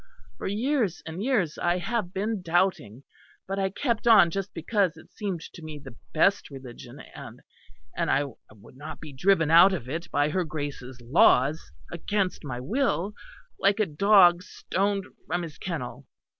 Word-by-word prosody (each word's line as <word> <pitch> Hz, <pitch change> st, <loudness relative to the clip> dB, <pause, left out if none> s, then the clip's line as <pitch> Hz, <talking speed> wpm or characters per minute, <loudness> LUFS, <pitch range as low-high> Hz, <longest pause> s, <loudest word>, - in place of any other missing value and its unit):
For -, -, -4 dB
years 220 Hz, -, -1 dB
and 165 Hz, +3 st, -6 dB
years 210 Hz, -, 0 dB
I 175 Hz, +1 st, +1 dB
have 210 Hz, 0 st, -2 dB
been 205 Hz, +2 st, -2 dB
doubting; 170 Hz, -, 0 dB, 0.4 s
but 195 Hz, +1 st, -3 dB
I 195 Hz, 0 st, +1 dB
kept 235 Hz, +3 st, -2 dB
on 215 Hz, -7 st, +7 dB
just 195 Hz, +2 st, -4 dB
because 185 Hz, +1 st, 0 dB
it -, -, -16 dB
seemed 195 Hz, -6 st, -4 dB
to 170 Hz, -, -11 dB
me 155 Hz, -1 st, -8 dB
the 135 Hz, -4 st, -12 dB, 0.2 s
best 195 Hz, +6 st, +2 dB
religion; 130 Hz, -4 st, -11 dB
and -, -, -11 dB, 0.5 s
and -, -, -1 dB
I 140 Hz, -, +3 dB, 0.3 s
would 110 Hz, +4 st, -17 dB
not 150 Hz, +3 st, -8 dB
be 150 Hz, -3 st, -10 dB
driven 165 Hz, +2 st, +2 dB
out 175 Hz, +4 st, +8 dB
of 140 Hz, -10 st, -4 dB
it 160 Hz, +6 st, -5 dB
by 145 Hz, +1 st, +1 dB
her 185 Hz, +4 st, 0 dB
Grace's 145 Hz, -5 st, -6 dB
laws 135 Hz, +3 st, +3 dB, 0.2 s
against 185 Hz, +2 st, -2 dB
my 125 Hz, -4 st, -5 dB
will, 210 Hz, -, -1 dB, 0.5 s
like 200 Hz, +2 st, +2 dB
a 215 Hz, -, +3 dB
dog 180 Hz, +1 st, +5 dB
stoned 195 Hz, +2 st, -2 dB, 0.2 s
from 175 Hz, +2 st, -1 dB
his 160 Hz, -3 st, -9 dB
kennel." 135 Hz, -7 st, -6 dB
175 Hz, 165 wpm, -26 LUFS, 150-200 Hz, 0.5 s, out